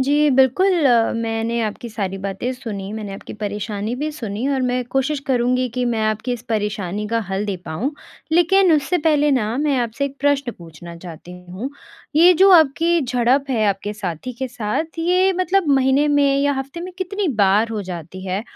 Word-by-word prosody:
जी, 290 +3 +3
बिल्कुल, 265 +9 +4 0.5
मैंने 225 +1 -1
आपकी 220 +2 -4
सारी 195 -3 -4
बातें 195 +6 -3
सुनी, 210 -6 -6
मैंने 215 -2 -6
आपकी - - -9
परेशानी 210 +2 -3
भी 305 +3 -2
सुनी 230 -3 -4
और 270 -2 0
मैं 250 0 0
कोशिश 270 +2 0
करूँगी 250 0 +1
कि 250 - +1
मैं 235 -2 0
आपकी 215 +3 -1
इस 240 -2 -5
परेशानी 210 -2 -2
का 230 +1 0
हल 195 +2 -2
दे 200 - -2
पाऊँ, 190 - -2 0.4
लेकिन 350 +2 +4
उससे 305 +4 +1
पहले 295 -2 +2
न 250 -6 +2 0.2
मैं 290 -3 +1
आपसे 240 +3 -2
एक 280 0 -5
प्रश्न 280 -3 +1
पूछना 170 0 -11
चाहती 170 0 -11 0.2
हूँ। 210 +9 -5 0.5
ये 350 +3 +7
जो 390 - +7
आपकी 335 0 +4
झड़प 255 +1 +1
है 225 -4 +1
आपके 200 +1 -2
साथी 200 +2 -5
के 260 - -3
साथ 245 +8 -3
ये 365 +3 +3
मतलब 370 -1 +1
महीने 270 +3 +3
में 285 -1 +3
या 285 0 +2
हफ़्ते 275 +5 -6
में 365 +1 -7
कितनी 390 +1 -2
बार 200 +4 +3
हो 220 -2 -3
जाती 180 0 -8
है? 190 +3 -2
250 Hz, 185 wpm, -20 LUFS, 210-290 Hz, 0.5 s, ये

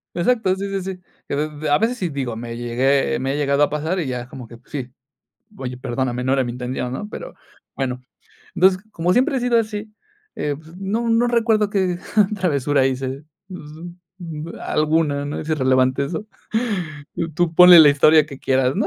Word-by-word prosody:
Exacto 190 +1 +1
sí 195 +1 -4
sí 195 -1 -2
sí, 185 -1 -6 0.3
y - - -2
a - - 0
d 150 0 -3
a 145 - +5
veces 230 +3 0
sí 180 -6 -2
digo 135 -6 -3
me 115 +1 -6
llegué 125 +4 +1
me 135 +1 -1
he - - -2
llegado 140 -1 +1
a 145 - +3
pasar 155 +5 -2
y 160 - -2
ya 125 -1 -3
es 120 - -10
como 125 -1 -10
que 115 - -12
sí: 130 -4 -6 0.7
"Oye 125 -4 -5
perdóname 125 -1 -2
no 130 +1 +1
era 135 -1 +2
mi 120 - -4
intención", 125 0 -4
¿no?, 205 +10 -5
pero - - -8 0.4
bueno, 125 -2 -3 0.5
entonces 185 0 +4
como 175 -1 0
siempre 260 +4 +2
he - - 0
sido 240 -1 +2
así, 215 -1 -4 0.4
eh, 145 -1 -2
pues 160 +4 -14
no 215 +5 -2
no 230 +1 +3
recuerdo 225 -3 +2
que 185 -3 0 0.4
travesura 145 -7 +1
hice, 135 +1 -2 1.4
alguna, 155 -2 0
¿no?, 145 - -4
es 155 - -7
irrelevante 130 -2 +2
eso, 170 +8 -5 1.1
tú 170 0 0
ponle 180 0 +10
la 150 -2 +9
historia 150 +2 +5
que 140 -3 -9
quieras, 130 0 +1
¿no?, 215 - +1
150 Hz, 190 wpm, -21 LUFS, 130-190 Hz, 1.4 s, ponle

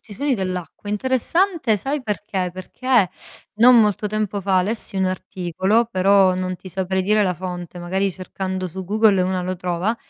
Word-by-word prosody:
i - - -9
suoni 275 +5 0
dell'acqua. 185 0 -5
Interessante, 260 - +1
sai 275 +5 -3
perché? 205 -4 -3
Perché, 205 +3 +1 0.5
non 235 +2 +7
molto 210 -1 +1
tempo 210 -1 -2
fa 190 -1 +3
lessi 205 +1 -3
un 190 - +2
articolo, 185 +4 0
però 190 -1 +4
non 185 0 -3
ti 185 - -11
saprei 190 +1 -1
dire 210 +2 +3
la 185 - +1
fonte, 180 -1 -6
magari 190 +3 -1
cercando 185 0 -4
su 190 +3 -7
Google 205 0 +3
una 185 0 -1
lo 185 +1 -3
trova, 180 +5 -1
190 Hz, 165 wpm, -21 LUFS, 185-215 Hz, 0.5 s, non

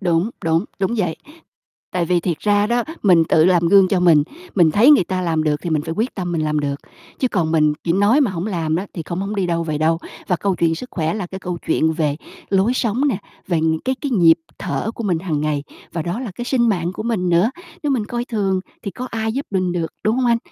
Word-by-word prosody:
Đúng, 175 +2 +1
đúng, 165 +3 +2
đúng 195 +4 0
vậy. 180 -7 -1 0.8
Tại 180 -2 0
vì 175 +1 +2
thiệt 170 -2 -2
ra 205 0 +2
đó, 240 +2 +1 0.2
mình 175 -5 +5
tự 155 - +4
làm 175 -2 +3
gương 195 0 +6
cho 185 -2 +1
mình, 165 -4 +5 0.3
mình 170 -5 +5
thấy 220 - +5
người 285 -11 +6
ta 185 +1 -2
làm 165 -3 0
được 150 -1 +2
thì 175 - -3
mình 155 -2 +1
phải 160 +2 -4
quyết 225 +6 -1
tâm 180 -3 -3
mình 165 -2 0
làm 150 -1 0
được, 140 -1 -1 0.5
chứ 255 - +2
còn 170 -8 0
mình 155 -2 +3
chỉ 170 - +1
nói 205 - +4
mà 260 -7 +2
hổng 180 +1 -4
làm 165 -6 -1
đó 185 - -2
thì 165 - -4
không 175 +1 -3
hổng 200 +2 -3
đi 190 -2 0
đâu 170 -1 -1
về 155 -2 -2
đâu. 160 +1 +2 0.3
Và 180 - +2
câu 195 +2 0
chuyện 165 -1 +2
sức 250 +10 -8
khỏe 160 -2 -1
là 210 -4 -3
cái 190 +2 -8
câu 180 -1 -4
chuyện 160 0 +2
về 155 -3 0 0.3
lối 195 +4 +3
sống 250 +4 +1
nè, 220 -9 0 0.3
về 170 -4 +1
những 160 0 +1
cái 260 - +1
cái 285 - -3
nhịp 170 -8 +5 0.2
thở 220 - -2
của 230 - -5
mình 180 -5 +1
hằng 160 -4 -2
ngày 150 -1 -1 0.3
và 165 - -2
đó 175 +8 -3
là 250 -5 -5
cái 240 - -4
sinh 245 -2 +2
mạng 175 -4 0
của 200 - -5
mình 220 -6 -1
nữa. 175 +7 +3 0.3
Nếu 295 - 0
mình 240 -6 0
coi 240 +1 -3
thường 200 -6 -1 0.2
thì 200 - -4
có 250 +6 -6
ai 220 -1 -2
giúp 275 +4 -3
mình 185 -2 0
được, 170 -2 -2
đúng 215 +2 +2
hông 255 -1 +1
anh? 235 -1 +3
180 Hz, 265 wpm, -20 LUFS, 165-215 Hz, 0.8 s, gương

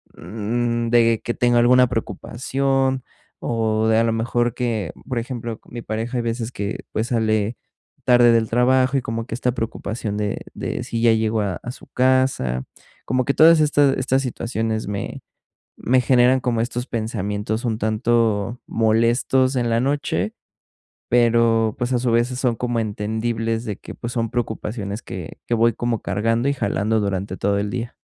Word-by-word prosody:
mm, 115 +5 -2
de 115 -1 +4
que 120 - -2
tengo 120 -1 +2
alguna 125 +1 +5
preocupación 130 +4 -1 0.4
o 110 -1 0
de 110 0 +4
a 115 - +4
la 115 - +1
mejor 120 +1 0
que, 115 -8 -2
b - - -18
por 125 -2 0
ejemplo, 115 -2 -5
mi 120 -1 -7
pareja 115 +4 -3
hay 120 - -1
veces 115 0 -3
que, 100 -3 -4
pues, 110 +2 -1
sale 110 -2 0 0.5
tarde 120 -1 +6
del 115 -1 +2
trabajo 130 +3 +3
y - - 0
como 115 -1 -4
que 115 - -5
esta 125 0 0
preocupación 110 -2 -4
de 105 -1 -2
de - - -4
si 115 - -3
ya 115 -1 +5
llegó 110 -1 +1
a 95 -4 -2
a 120 - -4
su - - -13
casa. 130 - +1 0.4
Como 130 0 0
que 140 - +1
todas 160 +2 +7
estas 145 -2 +3
estas 130 +1 +1
situaciones 115 -3 -2
me 100 -1 -4 0.6
me 130 +2 +2
generan 125 +1 +4
como 120 -2 0
estos 120 +1 -3
pensamientos 110 0 -3
un 110 -1 -1
tanto 115 0 +1
molestos 120 +4 +2
en 120 -2 0
la 115 0 +2
noche, 130 - -1 0.8
pero, 115 -2 +3
pues, 125 +1 -2
a 120 - +2
su 125 - 0
vez, 120 +2 +2
sí 125 - -5
son 125 -3 +1
como 120 0 -1
entendibles 110 +2 -2
de 105 -4 -4
que, - - -10
pues, 120 +1 -6
son 115 -3 -1
preocupaciones 110 -2 -3
que 90 -4 -8
que - - 0
voy 115 0 +3
como 120 -2 -2
cargando 115 +6 0
y - - +1
jalando 110 -3 0
durante 95 -1 -2
todo 100 0 +1
el 100 0 -2
día. 115 +3 -4
115 Hz, 175 wpm, -22 LUFS, 110-125 Hz, 0.8 s, todas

